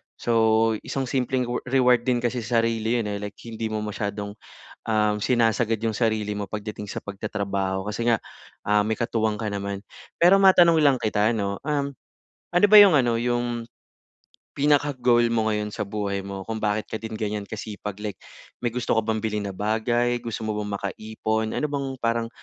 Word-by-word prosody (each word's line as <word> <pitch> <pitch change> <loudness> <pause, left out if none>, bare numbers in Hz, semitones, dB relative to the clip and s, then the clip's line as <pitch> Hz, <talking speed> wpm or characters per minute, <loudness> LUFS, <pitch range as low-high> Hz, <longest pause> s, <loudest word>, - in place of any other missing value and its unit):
So, 115 -1 +3
isang 135 - -3
simpleng 130 0 0
rew 120 0 -2
reward 125 -2 +3
din 125 -1 +1
kasi 120 +1 0
sarili 115 0 0
'yon 105 -3 -1
eh, 100 - -3
like 105 0 -6
hindi 115 -1 -4
mo 110 -1 -3
masyadong, 100 -1 -4 0.5
um, 105 -1 +1
sinasagad 115 -2 +2
yung 110 -1 -1
sarili 110 -3 0
mo 105 - -3
pagdating 105 0 -6
sa - - -4
pagtatrabaho 100 -1 -3
kasi 105 +3 -3
nga, 115 -2 +3 0.5
um, 105 0 +4
may 110 +1 -2
katuwang 110 -2 0
ka 110 - -2
naman. 100 -1 -3 0.4
Pero 175 +3 +7
matanong 170 -4 +6
lang 135 -3 +4
kita 105 0 +1
no, 100 -3 -1
um, 140 -2 -1 0.6
ano 175 +3 +2
ba 210 - +10
yung 195 -6 +8
ano, 120 -3 +2
yung 120 -1 -1 0.9
pinaka-goal 135 -5 +3
mo 110 -1 +1
ngayon 105 0 -1
sa 105 - -2
buhay 100 -1 -3
mo 100 0 -6
kung 110 - -2
bakit 105 0 -1
ka - - -2
din 110 0 -7
ganiyan 105 -1 -3
kasipag? 105 -2 -6
Like 105 -2 -4 0.5
may 120 - 0
gusto 120 -2 -1
ka - - +2
bang 110 -1 -1
bilhin 105 -1 -1
na - - -5
bagay? 120 +3 +1
Gusto 115 -1 -4
mo 105 - -1
bang 105 -1 -4
makaipon? 110 +2 -3
Ano 150 - 0
bang 140 -1 -2
parang 115 0 0
110 Hz, 180 wpm, -24 LUFS, 105-120 Hz, 0.9 s, ba